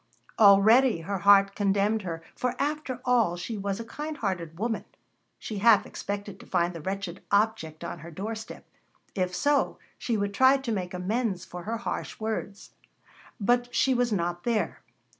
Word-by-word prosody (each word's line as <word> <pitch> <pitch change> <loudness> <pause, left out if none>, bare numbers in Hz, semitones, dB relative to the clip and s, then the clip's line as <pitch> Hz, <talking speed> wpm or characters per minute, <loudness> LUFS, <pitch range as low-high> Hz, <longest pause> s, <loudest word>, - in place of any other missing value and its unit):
Already 215 +1 +6
her 195 +3 -3
heart 200 0 +6
condemned 205 +2 +1
her, 165 -3 -5
for 250 -1 -1
after 285 -3 -2
all, 230 -8 +2
she 220 +6 -5
was 200 0 -3
a 230 - -5
kind 300 +6 -6
hearted 175 -6 -3
woman. 225 +3 -2 0.5
She 210 -3 -5
half 220 0 +5
expected 200 -1 -6
to - - -14
find 175 -1 +1
the 165 - -7
wretched 190 +1 -4
object 200 -7 0
on 175 - -5
her 165 +3 -10
doorstep. 215 +6 -6 0.5
If 180 -2 -1
so, 285 +7 +1 0.2
she 230 -3 -1
would 200 0 -2
try 260 +5 +5
to 265 -3 -4
make 185 -4 -3
amends 190 0 -1
for 175 -1 -9
her 230 +2 -2
harsh 235 - -5
words. 215 -2 -4 0.7
But 245 +3 +1
she 265 - +3
was 245 -1 +1
not 175 -3 -1
there. 230 -3 -1
205 Hz, 165 wpm, -27 LUFS, 185-230 Hz, 0.7 s, Already